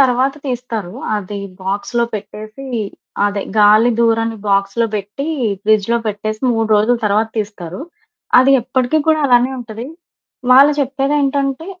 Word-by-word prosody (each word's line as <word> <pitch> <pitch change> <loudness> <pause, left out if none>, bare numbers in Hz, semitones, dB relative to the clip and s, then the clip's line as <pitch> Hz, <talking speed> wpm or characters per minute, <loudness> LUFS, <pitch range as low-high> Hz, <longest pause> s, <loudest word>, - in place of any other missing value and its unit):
తర్వాత 265 +1 +3
తీస్తారు 235 -7 -4 0.2
అది 205 0 -5 0.2
బాక్స్‌లో 205 +5 -1
పెట్టేసి, 215 +5 -8 0.6
అదే 200 -1 -2 0.2
గాలి 215 +3 +6
దూరని 225 -1 +1
బాక్స్‌లో 200 +4 +1
బెట్టి 210 +8 -4 0.4
ఫ్రిడ్జ్‌లో 215 +2 +2
పెట్టేసి 215 +1 -3
3 225 -1 0
రోజుల 220 +4 +2
తర్వాత 215 +2 +1
తీస్తారు. 200 -3 -5 0.6
అది 265 - +4
ఎప్పటికి 255 +4 0
కూడా 315 -1 +3
అలానే 245 0 +4
ఉంటది 230 0 -7 0.6
వాళ్ళు 275 +3 +7
చెప్పేదేంటంటే 275 +1 0
230 Hz, 115 wpm, -17 LUFS, 210-260 Hz, 0.6 s, వాళ్ళు